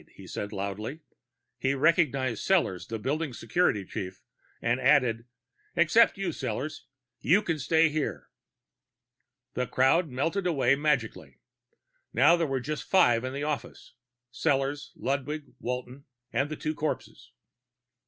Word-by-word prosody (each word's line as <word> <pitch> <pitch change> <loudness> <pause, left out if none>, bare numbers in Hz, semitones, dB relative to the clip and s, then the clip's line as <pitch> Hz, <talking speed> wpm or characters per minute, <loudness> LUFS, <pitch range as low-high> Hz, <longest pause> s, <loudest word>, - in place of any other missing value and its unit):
he - - -12
said 100 - -5
loudly. 105 - -4 0.6
He 135 +1 +1
recognized 135 -5 +2
Sellors, 170 - +1
the 115 - -4
building's 135 +3 -3
security 115 - +1
chief, 95 0 -6 0.4
and 120 +2 0
added, 125 -3 +3 0.5
"Except 175 +8 +4
you, 195 -2 -1
Sellors. 145 +1 -4 0.3
You 200 +5 +3
can 165 -4 -1
stay 160 +4 +4
here." 155 -1 -3 1.2
The 125 0 -1
crowd 150 +6 +3
melted 165 +9 -1
away 145 -6 +3
magically. 120 - -1 0.8
Now 145 +8 +6
there 170 -2 0
were 135 -1 -1
just 150 +4 -4
five 120 -12 +4
in 130 - -3
the 140 +2 -4
office 150 -2 -5 0.4
Sellors, 140 +1 0
Ludwig, 145 +2 -3
Walton, 125 +2 -5 0.3
and 140 +1 +1
the 155 - -4
two 155 +1 -3
corpses. 155 0 -4
140 Hz, 130 wpm, -28 LUFS, 125-155 Hz, 1.2 s, Now